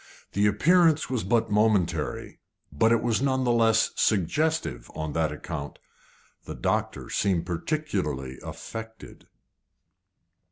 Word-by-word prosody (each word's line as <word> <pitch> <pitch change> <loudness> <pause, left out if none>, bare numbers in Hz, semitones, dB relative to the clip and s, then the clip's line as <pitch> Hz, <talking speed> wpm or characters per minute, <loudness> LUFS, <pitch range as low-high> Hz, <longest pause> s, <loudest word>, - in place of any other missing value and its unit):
The 100 +1 +3
appearance 160 - +3
was 125 -4 -1
but 110 +3 +1
momentary, 95 -8 0 0.3
but 110 +10 +2
it 115 -1 +3
was 120 0 +1
none 130 -1 +1
the 120 - +2
less 115 -1 +3
suggestive 100 - 0
on 80 -1 -4
that 80 -2 0
account. 75 -1 -6 0.7
The - - -7
doctor - - -2
seemed 90 -4 +1
particularly 85 - -3
affected. 110 0 -9
105 Hz, 115 wpm, -26 LUFS, 80-120 Hz, 0.7 s, The